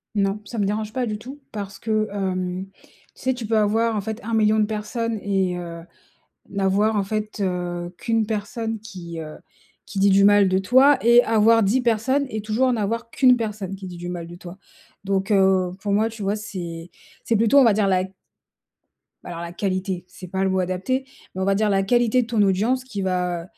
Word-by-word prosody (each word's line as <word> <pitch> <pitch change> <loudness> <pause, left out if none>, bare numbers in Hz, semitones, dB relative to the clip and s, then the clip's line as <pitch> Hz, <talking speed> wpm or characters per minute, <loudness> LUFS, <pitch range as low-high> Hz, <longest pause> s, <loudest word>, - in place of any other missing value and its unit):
Non, 200 +1 +1
ça 230 +1 -6
me 200 - +2
dérange 215 +2 -2
pas 255 -2 -1
du 215 -2 -3
tout 265 +6 -11
parce 200 -2 -6
que, 215 -1 0
hem, 185 -1 -2
tu - - -29 0.3
sais, 260 0 -1
tu 240 -3 -6
peux 220 +1 +1
avoir 220 +2 +2
en - - -1
fait 220 +2 -6
1000000 220 -1 +2
de 210 - +3
personnes 220 +1 -3
et 190 -3 0
heu, 170 -1 -7 0.7
n'avoir 200 +2 +1
en 200 - +2
fait, 215 +1 -4
heu, 175 -2 -2
qu'une 225 -1 0
personne 225 +1 -3
qui, 175 -6 -9
heu, 155 -1 -7 0.5
qui 200 - -6
dit 200 +1 +4
du 195 +1 +5
mal 205 -1 +6
de 185 0 +2
toi 260 +7 +5
et 235 +1 +7
avoir 225 +1 +4
10 220 +7 +2
personnes 250 +4 +1
et 215 -3 -4
toujours 230 +5 +1
n'avoir 230 +1 -2
qu'une 255 -1 +5
personne 210 -4 -4
qui 190 -1 -8
dit 175 -1 -8
du 175 +1 -6
mal 175 -2 -5
de 175 +1 -10
toi. 180 +2 -11 0.5
Donc, 195 +1 -1
heu, 190 -2 +3
pour 200 0 -2
moi 220 +2 +2
tu 220 -1 -9
vois, 200 +2 0
c'est 175 -5 -7 0.3
c'est 230 - +1
plutôt 230 +6 +4
on 270 - +7
va 225 - +5
dire 205 0 +1
la 185 -1 +2 1.2
bah, - - -9
alors 170 - -6
la 170 0 -6
qualité, 185 -1 -2
c'est 185 0 -11
pas 190 +2 -2
le 190 - +2
mot 190 0 +1
adapté, 185 +9 -1 0.3
mais 190 - -4
on 190 - 0
va 195 0 +2
dire 215 +1 +1
la 195 -1 +2
qualité 240 +3 +3
de 230 - -5
ton 230 -3 +1
audience 215 +7 +2
qui 215 -6 -5
va, 180 -2 -1
205 Hz, 215 wpm, -23 LUFS, 190-225 Hz, 1.2 s, et